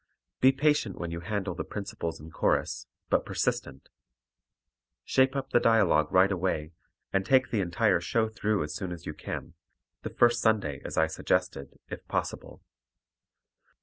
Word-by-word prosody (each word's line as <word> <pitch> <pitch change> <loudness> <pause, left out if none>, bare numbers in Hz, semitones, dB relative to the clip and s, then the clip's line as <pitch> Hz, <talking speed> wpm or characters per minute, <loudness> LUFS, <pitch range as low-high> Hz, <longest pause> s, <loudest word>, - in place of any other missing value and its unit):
Be 130 - +6
patient 140 -7 +1
when 85 -1 -4
you 85 - -4
handle 100 0 -3
the 90 - -4
principals 100 -5 -5
and 80 +2 -12
chorus, - - 0 0.2
but - - +3
persistent. 65 -1 -2 1.2
Shape 130 +1 +3
up 135 -1 -3
the - - +5
dialogue 100 -10 +3
right 95 +2 +5
away, 85 -4 -1 0.4
and 95 - +2
take 130 +4 +3
the 110 - +1
entire 95 +1 +2
show 110 +6 +1
through 110 -2 -1
as 75 - -5
soon 95 -4 -4
as 85 -1 -8
you 75 - -4
can - - -6 0.5
the - - -5
first 120 0 +3
Sunday 100 -11 +1
as - - -6
I 80 - +5
suggested, 75 -3 -2
if - - -7
possible. - - -4
95 Hz, 155 wpm, -28 LUFS, 85-115 Hz, 1.2 s, Be